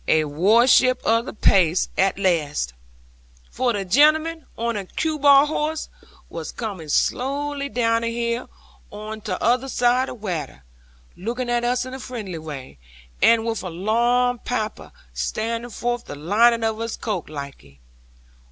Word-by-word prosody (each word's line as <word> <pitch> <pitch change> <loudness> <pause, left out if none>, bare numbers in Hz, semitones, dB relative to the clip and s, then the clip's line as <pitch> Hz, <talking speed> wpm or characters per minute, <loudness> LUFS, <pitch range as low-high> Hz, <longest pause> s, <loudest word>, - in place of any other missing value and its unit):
A 155 - +4
warship 230 - +4
of 230 +1 +2
the - - -5
pace, 180 -5 +3
at 190 0 +2
laste!" 155 - 0 0.8
'For 245 -3 0
a 195 -1 -3
gentleman, 310 - +3
on 235 0 -1
a 205 - -3
cue 310 - -2
ball 280 0 +7
horse, 310 +1 -2 0.4
was - - -6
coming 195 -9 -6
slowly 280 - -1
down 230 -3 +1
the 230 0 -1
hill 235 +1 -2 0.4
on 215 +1 -7
tother 235 +6 0
zide 250 0 +2
of 245 - -9
watter, 160 - -4 0.5
looking 240 +6 -3
at 240 0 +1
us 245 +1 0
in 255 - -8
a 265 - -6
friendly 215 -10 -6
way, 135 - -9 0.4
and 230 -1 +5
with 225 -1 -2
a 185 - -5
long 240 +7 +1
papper 220 -3 -4 0.2
standing 230 - -3
forth 240 +1 -3
the - - -7
lining 225 +10 +3
of 220 0 -1
his 230 0 -4
coat 205 -7 -4
laike. 140 - -9
230 Hz, 150 wpm, -22 LUFS, 185-250 Hz, 0.8 s, ball